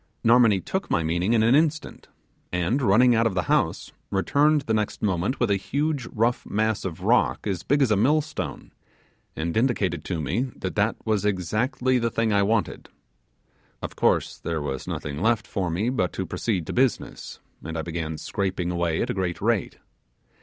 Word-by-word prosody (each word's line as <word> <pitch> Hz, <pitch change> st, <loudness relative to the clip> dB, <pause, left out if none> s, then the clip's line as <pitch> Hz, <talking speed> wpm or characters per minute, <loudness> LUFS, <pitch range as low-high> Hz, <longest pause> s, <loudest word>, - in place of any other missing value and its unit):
Narmonee 115 Hz, -4 st, +5 dB
took 190 Hz, +1 st, -3 dB
my 85 Hz, -, +1 dB
meaning 85 Hz, +7 st, 0 dB
in 110 Hz, -2 st, +4 dB
an 115 Hz, +2 st, +4 dB
instant, 155 Hz, +1 st, 0 dB, 0.4 s
and 90 Hz, +10 st, 0 dB
running 120 Hz, +2 st, +5 dB
out 115 Hz, 0 st, +3 dB
of 100 Hz, -, -3 dB
the 90 Hz, -, +1 dB
house, -, -, 0 dB, 0.2 s
returned 145 Hz, +10 st, +2 dB
the 115 Hz, -5 st, -2 dB
next 105 Hz, 0 st, -2 dB
moment 95 Hz, +5 st, 0 dB
with 120 Hz, -4 st, +1 dB
a 100 Hz, -, +3 dB
huge 140 Hz, +5 st, -2 dB
rough 115 Hz, +3 st, 0 dB
mass 110 Hz, 0 st, 0 dB
of 85 Hz, -4 st, -5 dB
rock 65 Hz, +3 st, +2 dB
as 95 Hz, -5 st, -2 dB
big 145 Hz, +1 st, +2 dB
as 125 Hz, -, +1 dB
a -, -, +5 dB
millstone, 125 Hz, -, -1 dB, 0.6 s
and 80 Hz, +1 st, -3 dB
indicated 105 Hz, -, 0 dB
to 85 Hz, -3 st, -2 dB
me 75 Hz, -, -1 dB
that 95 Hz, -, -4 dB
that 105 Hz, +2 st, +1 dB
was 110 Hz, -3 st, +1 dB
exactly 120 Hz, -, 0 dB
the 115 Hz, 0 st, 0 dB
thing 115 Hz, -1 st, 0 dB
I 100 Hz, -, +4 dB
wanted. 110 Hz, +2 st, -1 dB, 0.9 s
Of -, -, -5 dB
course -, -, +1 dB
there 85 Hz, -1 st, -3 dB
was 65 Hz, -3 st, -4 dB
nothing 75 Hz, +1 st, -4 dB
left 110 Hz, 0 st, +2 dB
for 95 Hz, -4 st, -2 dB
me 100 Hz, +9 st, 0 dB
but 90 Hz, -9 st, -1 dB
to 95 Hz, -, -3 dB
proceed 90 Hz, +1 st, -2 dB
to -, -, -5 dB
business, 130 Hz, 0 st, -1 dB, 0.2 s
and 80 Hz, +1 st, -5 dB
I 80 Hz, -, -2 dB
began 80 Hz, -2 st, -4 dB
scraping 95 Hz, -2 st, -2 dB
away 85 Hz, -2 st, 0 dB
at -, -, -2 dB
a -, -, -2 dB
great 90 Hz, -3 st, -2 dB
rate. 110 Hz, -2 st, 0 dB
105 Hz, 185 wpm, -25 LUFS, 90-120 Hz, 0.9 s, Narmonee